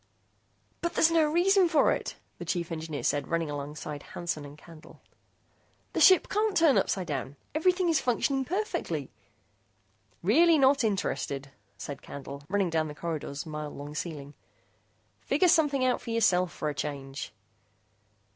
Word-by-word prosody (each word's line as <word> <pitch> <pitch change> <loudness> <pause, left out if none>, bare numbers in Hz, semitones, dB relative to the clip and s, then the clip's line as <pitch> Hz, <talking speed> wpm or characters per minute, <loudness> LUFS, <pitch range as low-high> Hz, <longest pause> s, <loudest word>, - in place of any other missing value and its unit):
"But 340 0 -2
there's 330 - +4
no 325 -2 +4
reason 365 +2 +4
for 315 -3 +4
it!" - - -3 0.2
the - - -5
chief 170 -2 -2
engineer 160 -2 -4
said, 145 -2 0
running 165 -2 -1
alongside 145 0 -6
Hansen 170 -3 -5
and 145 +1 -11
Candle. 160 0 -15 0.9
"The - - -1
ship 375 -2 +7
can't 420 -1 0
turn 325 -5 +5
upsidedown. 145 -7 -2 0.2
Everything 360 +4 +2
is 320 -5 +2
functioning 265 +2 +1
perfectly!" 335 - -3 1.1
"Really 320 - +5
not 275 -1 +4
interested," 140 -9 -2 0.3
said 140 -1 -7
Candle, 140 0 -8
running 195 -3 +1
down 160 -1 +1
the 150 - -8
corridor's 150 -2 -4
mile 150 -1 -5
long 145 +1 -8
ceiling. 150 -3 -6 0.9
"Figure 370 - +2
something 290 -6 +3
out 255 - +1
for - - -8
yourself 185 -6 +2
for 155 - -4
a 150 - -1
change." 140 -2 -5
175 Hz, 145 wpm, -28 LUFS, -, 1.1 s, ship